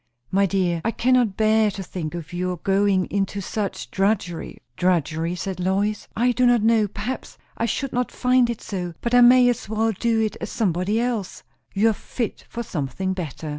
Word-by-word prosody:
"My 195 +1 +3
dear, 180 -3 0
I - - +1
cannot 245 -3 +2
bear 220 0 +3
to 195 -1 -6
think 170 -3 -5
of 170 -1 -7
your 180 0 -2
going 195 +1 +2
into 200 0 -1
such 200 0 -4
drudgery!" 195 -4 -1 0.2
"Drudgery?" 170 -1 0
said 185 0 -4
Lois. 200 +3 0
"I 245 +2 +3
do 250 +1 +3
not 240 -3 +4
know, 225 -2 +4
perhaps 215 +6 -6 0.2
I 230 - -1
should 275 +4 -2
not 250 0 -1
find 250 -1 +2
it 235 - -4
so. 180 -4 -4
But 235 - -2
I 245 - +7
may 245 +1 +7
as 240 -4 -1
well 220 +1 +1
do 225 +2 0
it 215 -1 -1
as - - -4
somebody 200 0 0
else." 235 -5 -2 0.3
"You 215 +3 +4
are - - -1
fit 230 +2 -5
for 235 - -4
something 175 - -3
better." 160 -4 -5
205 Hz, 190 wpm, -23 LUFS, 185-230 Hz, 0.3 s, I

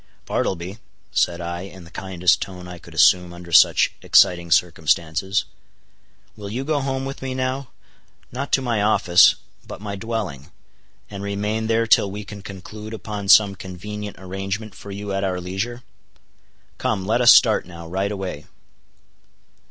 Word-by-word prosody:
"Bartleby," 95 +4 -2 0.3
said 85 0 +1
I, 85 0 -4
in 95 -1 -10
the 85 - -15
kindest 90 -2 +1
tone 90 -2 -7
I 90 -1 -9
could - - -14
assume 90 -1 +5
under 85 0 -11
such - - +6
exciting 85 -1 +4
circumstances, 85 +3 +1 0.9
"will 105 -2 -8
you 120 +6 -3
go 150 +1 0
home 135 0 -2
with 135 +1 -6
me 130 -1 -4
now—not 130 - -6
to 135 - +3
my 115 -4 0
office, 95 -4 +5 0.3
but - - -8
my 100 -1 -5
dwelling—and 100 - -8
remain 105 +2 -2
there 115 0 +2
till 105 -2 +4
we 105 +2 -6
can 100 0 -10
conclude 105 +2 -9
upon 105 -2 -6
some 100 -1 +7
convenient 100 +2 -7
arrangement 95 +3 -5
for 100 - -12
you 100 0 -5
at 95 0 -1
our 95 -2 -1
leisure? 100 +7 -4 1.0
Come, 95 -3 -1
let 115 +4 +1
us 120 - +9
start - - +5
now, 85 -2 -10
right 95 +4 -2
away." 95 -7 -5
100 Hz, 150 wpm, -22 LUFS, 90-110 Hz, 1.0 s, us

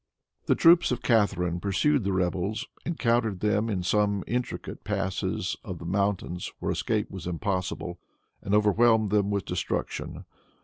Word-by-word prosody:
The - - +4
troops 170 +1 +6
of 125 -1 -2
Catharine 95 -7 +2
pursued 115 +8 +1
the 100 - 0
rebels, 95 +3 -1 0.2
encountered 115 - +1
them 105 +2 +1
in 95 -4 -1
some 100 +1 +1
intricate 125 +2 -4
passes 100 -3 -2
of - - -6
the - - -9
mountains, 95 -1 -1
whence - - -2
escape 110 -2 -1
was 95 -3 -7
impossible, 90 -1 -3 0.4
and 100 - 0
overwhelmed 110 0 +4
them 100 -1 +2
with 100 -3 -1
destruction. - - -3
100 Hz, 140 wpm, -27 LUFS, 95-110 Hz, 0.4 s, troops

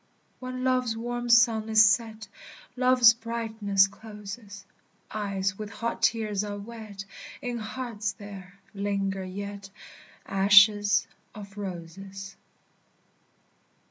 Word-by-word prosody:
When 255 0 -5
love's 255 -3 +1
warm 240 +1 -4
sun 230 -2 +4
is 220 0 +7
set, 220 +1 +1 0.5
Love's 250 -2 +6
brightness 225 -4 +1
closes; 205 0 -10 0.5
Eyes 200 -2 -2
with 210 -1 -5
hot 230 +3 -4
tears 215 -3 +1
are 205 -1 -5
wet, 210 -2 -9 0.3
In 245 -3 -4
hearts 220 -2 -4
there 200 -2 -11 0.2
linger 195 -1 -2
yet 200 +1 -7 0.6
Ashes 205 +1 +5 0.3
of 200 -2 -10
roses. 195 +1 -8
210 Hz, 100 wpm, -27 LUFS, 200-230 Hz, 0.6 s, is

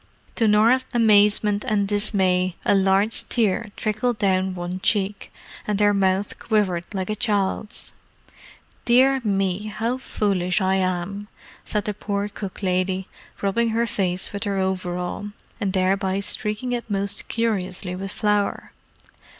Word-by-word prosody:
To 225 - +3
Norah's 230 +5 +4
amazement 210 -2 +4
and 210 -5 +1
dismay 185 -3 +2
a - - +4
large 195 +2 +2
tear 220 -1 +1
trickled 215 +2 -1
down 190 -2 +1
one 175 +1 -4
cheek, 200 0 -1 0.4
and 210 -1 0
her 205 0 +4
mouth 195 0 0
quivered 190 -6 0
like 190 0 -3
a - - -1
child's. 210 -2 -1 0.9
"Dear 260 +2 +4
me, 195 -1 0
how 225 +4 -2
foolish 195 -6 0
I 190 0 +2
am," 185 +2 -2 0.4
said 210 -2 -2
the 210 - -1
poor 205 0 -3
cook 200 -1 -8
lady, 185 0 0 0.4
rubbing 230 +4 +1
her 230 +1 +1
face 185 -4 -2
with 200 +2 -3
her 200 -1 -1
overall, 185 0 -2 0.3
and 200 -2 -1
thereby 190 0 +1
streaking 210 +4 -2
it 240 -1 -3
most 200 0 -2
curiously 190 -5 -2
with 195 +1 -5
flour. 210 -1 0
200 Hz, 135 wpm, -23 LUFS, 190-215 Hz, 0.9 s, Norah's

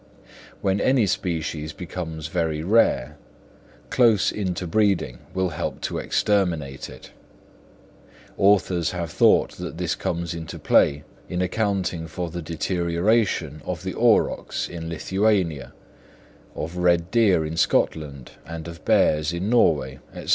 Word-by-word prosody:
When 95 +1 +1
any 130 -4 +3
species 80 -4 -2
becomes 80 -3 -6
very 80 -2 -1
rare, 80 - +2 0.7
close 115 -5 +4
interbreeding 95 - 0 0.2
will 95 -1 +1
help 75 - -4
to - - -3
exterminate 85 -10 0
it; - - -13 1.2
authors 95 -4 +2
have 85 -2 -4
thought - - +4
that - - -6
this - - -1
comes 85 0 -3
into 80 -1 -7
play 70 +1 +3 0.3
in 90 - -2
accounting 90 -3 -1
for 85 0 -5
the 85 +1 -5
deterioration 85 0 0
of - - -5
the - - -3
aurochs - - +1
in 80 -1 -6
Lithuania, 95 -3 0 0.8
of 85 +3 -5
red 85 0 +2
deer 100 -9 +3
in 80 +1 -4
Scotland 70 -5 0
and 80 0 -7
of 85 -1 -10
bears 75 +1 +3
in 90 +5 -2
Norway, 75 - +2 0.2
&c. - - -7
85 Hz, 125 wpm, -24 LUFS, 80-95 Hz, 1.2 s, close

